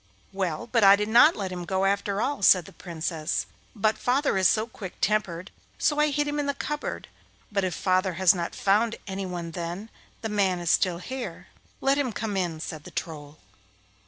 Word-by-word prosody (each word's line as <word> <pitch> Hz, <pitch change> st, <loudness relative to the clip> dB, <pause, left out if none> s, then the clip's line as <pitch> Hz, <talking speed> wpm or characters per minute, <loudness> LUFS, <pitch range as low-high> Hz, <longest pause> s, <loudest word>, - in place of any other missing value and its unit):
'Well, 185 Hz, -5 st, -2 dB
but 230 Hz, -2 st, +1 dB
I 195 Hz, 0 st, +9 dB
didn't 230 Hz, +10 st, +5 dB
let 195 Hz, -3 st, -4 dB
him 180 Hz, -1 st, -5 dB
go, 190 Hz, +2 st, 0 dB
after 200 Hz, +1 st, 0 dB
all,' 285 Hz, -4 st, -2 dB
said 185 Hz, -3 st, +6 dB
the -, -, -12 dB
Princess; 165 Hz, -2 st, -3 dB, 0.3 s
'but 215 Hz, +1 st, +1 dB
father 270 Hz, +1 st, +1 dB
is 190 Hz, -1 st, +4 dB
so 215 Hz, +2 st, +2 dB
quick 200 Hz, -5 st, -9 dB
tempered, 190 Hz, -4 st, -1 dB, 0.3 s
so 295 Hz, -1 st, +1 dB
I 300 Hz, 0 st, +4 dB
hid 290 Hz, +1 st, 0 dB
him 290 Hz, 0 st, -2 dB
in 290 Hz, -, -1 dB
the 280 Hz, -, -1 dB
cupboard, 295 Hz, +1 st, -4 dB, 0.4 s
but 200 Hz, -1 st, 0 dB
if 180 Hz, -3 st, -1 dB
father 185 Hz, 0 st, +1 dB
has 185 Hz, 0 st, +5 dB
not 170 Hz, -2 st, -4 dB
found 220 Hz, +4 st, +2 dB
any 195 Hz, -1 st, -4 dB
one 175 Hz, -2 st, -5 dB
then 175 Hz, +6 st, -5 dB, 0.3 s
the 225 Hz, -, -3 dB
man 195 Hz, -3 st, +1 dB
is 175 Hz, -2 st, 0 dB
still 180 Hz, -2 st, +2 dB
here.' 255 Hz, +8 st, -7 dB, 0.3 s
'Let 275 Hz, +1 st, +2 dB
him 255 Hz, -5 st, -1 dB
come 210 Hz, -1 st, -3 dB
in,' 175 Hz, -4 st, -1 dB
said 155 Hz, -3 st, -6 dB
the -, -, -10 dB
Troll. 150 Hz, -3 st, -6 dB
195 Hz, 195 wpm, -26 LUFS, 175-225 Hz, 0.4 s, I